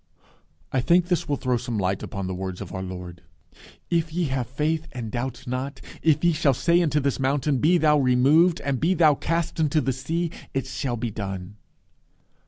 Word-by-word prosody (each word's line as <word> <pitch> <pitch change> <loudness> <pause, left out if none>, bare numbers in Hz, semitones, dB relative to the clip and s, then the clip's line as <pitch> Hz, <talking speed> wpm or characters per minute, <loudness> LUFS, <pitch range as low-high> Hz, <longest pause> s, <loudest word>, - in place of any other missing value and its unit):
I 130 - +1
think 175 +6 +3
this 175 -5 0
will 145 - +2
throw 130 -3 0
some 120 -1 -4
light 95 -1 0
upon 100 -1 -5
the 95 - -3
words 95 0 -5
of - - -7
our 95 - -4
Lord, 90 -2 -7 0.7
"If 165 -2 +1
ye 175 +2 -1
have 130 -2 -1
faith 155 +5 -1
and 115 -4 -5
doubt 125 0 -4
not, 130 +3 -4 0.2
if 155 -1 +2
ye 170 -1 +4
shall 140 -3 +2
say 170 +6 +3
unto 150 -3 +2
this 140 -1 -1
mountain, 135 +1 +1
Be 170 +6 +4
thou 150 -2 +4
removed, 140 +7 +4
and 140 -3 -1
be 180 +4 +2
thou 155 -4 +5
cast 165 +3 -2
into 155 0 +2
the 135 -2 0
sea; 160 +6 -2 0.2
it 135 - 0
shall 120 -3 -3
be 115 0 -3
done." 100 -1 -6
135 Hz, 195 wpm, -25 LUFS, 120-160 Hz, 0.7 s, thou